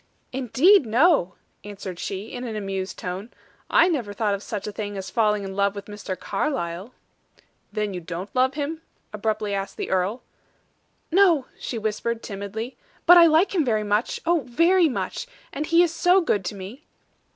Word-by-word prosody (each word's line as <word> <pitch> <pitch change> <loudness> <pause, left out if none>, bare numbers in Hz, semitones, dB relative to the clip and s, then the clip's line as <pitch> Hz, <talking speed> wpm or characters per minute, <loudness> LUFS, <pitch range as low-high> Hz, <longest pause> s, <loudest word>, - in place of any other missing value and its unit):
"Indeed, 270 - +4
no!" 240 - +3 0.3
answered 195 -3 -7
she, 200 +3 -5
in 245 - -6
an 230 -3 -4
amused 195 -2 -4
tone. 185 +5 -5 0.4
"I 345 - +5
never 250 - -1
thought 205 0 0
of 200 - -3
such 205 -1 -5
a 210 - -4
thing 205 -1 -5
as 190 0 -6
falling 210 -3 +2
in 195 0 -6
love 200 0 +1
with 200 0 -7
Mr. 205 -3 -6
Carlyle." 200 - -3 0.8
"Then 210 -1 -2
don't 170 +2 -5
you - - -41
love 260 +1 +2
him?" 310 +2 -3 0.3
abruptly 210 -1 -1
asked 195 0 -4
the - - -4
earl. 190 +6 0 0.9
"No!" 340 -7 +4
she 240 - -4
whispered, 220 +1 -2
timidly; 210 +4 -6 0.3
"but 355 - +9
I 340 -1 +9
like 325 +6 +3
him 345 -5 +2 0.2
much 210 +3 0
oh, 340 0 +3
very 335 +6 +4
much! - - -4 0.3
And 295 +2 -3
he 335 +1 +5
is 340 -2 0
so 355 +3 +4
good 210 - 0
to 205 - -3
me!" 200 +9 -9
220 Hz, 175 wpm, -24 LUFS, 200-300 Hz, 0.9 s, but